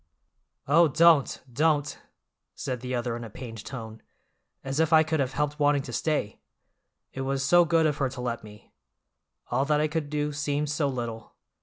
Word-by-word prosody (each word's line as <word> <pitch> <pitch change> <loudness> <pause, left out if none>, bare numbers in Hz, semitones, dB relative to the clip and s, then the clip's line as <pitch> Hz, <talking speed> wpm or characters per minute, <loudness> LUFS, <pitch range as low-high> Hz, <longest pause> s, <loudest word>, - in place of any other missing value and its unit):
"Oh, 165 +4 +5
don't, 160 -1 +4
don't!" 150 +1 +1 0.6
said 125 -2 -4
the 125 0 -3
other 120 -1 -2
in 120 - -6
a 115 - -8
pained 115 -1 -9
tone. 110 -4 -8 0.6
"As 135 +2 -3
if 160 0 +2
I 160 0 +7
could 155 0 -1
have 135 0 -1
helped 150 0 -2
wanting 145 -1 +3
to 120 - -8
stay! 150 -9 -2 0.7
It 135 - -5
was 135 0 -1
so 175 +3 +5
good 165 -1 +3
of 150 -1 +1
her 135 -3 0
to 125 -1 -7
let 120 -2 -3
me. 105 -1 -15 0.8
All 125 +3 +2
that 150 0 +2
I 155 - +2
could 155 -1 -3
do 150 0 -2
seemed 145 0 -1
so 150 -1 0
little. 120 -4 -5
140 Hz, 185 wpm, -27 LUFS, 125-150 Hz, 0.8 s, I